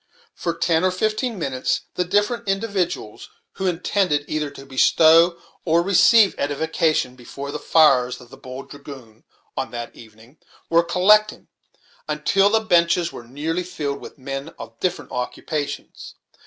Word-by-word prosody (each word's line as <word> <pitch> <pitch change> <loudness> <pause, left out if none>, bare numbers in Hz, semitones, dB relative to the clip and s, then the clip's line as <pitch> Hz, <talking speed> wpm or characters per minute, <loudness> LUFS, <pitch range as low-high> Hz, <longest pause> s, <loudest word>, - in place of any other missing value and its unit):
For 170 -1 -3
ten 165 0 +1
or 185 - +4
fifteen 215 +5 -1
minutes 130 -6 -1
the 180 - 0
different 205 +5 0
individuals, 195 - -2 0.2
who 190 - -3
intended 180 -3 0
either 150 -1 -2
to 140 -1 -12
bestow 165 +5 +4 0.2
or 170 0 +2
receive 200 +3 +5
edification 145 -2 0
before 140 +3 -8
the 150 - -5
fires 135 -7 +3
of 120 - -16
the - - -10
"Bold 130 +1 -10
Dragoon" 135 -6 -12 0.3
on - - -3
that 120 0 -7
evening, 110 +5 -17 0.3
were 165 0 +5
collecting, 205 +5 +3 0.6
until 195 0 +2
the 220 +1 +2
benches 175 -4 +2
were 120 - -10
nearly 155 +7 -3
filled 150 -6 -4
with - - -11
men 135 +3 -6
of - - -11
different 185 - -3
occupations. 145 +3 -5
160 Hz, 140 wpm, -22 LUFS, 135-185 Hz, 0.6 s, receive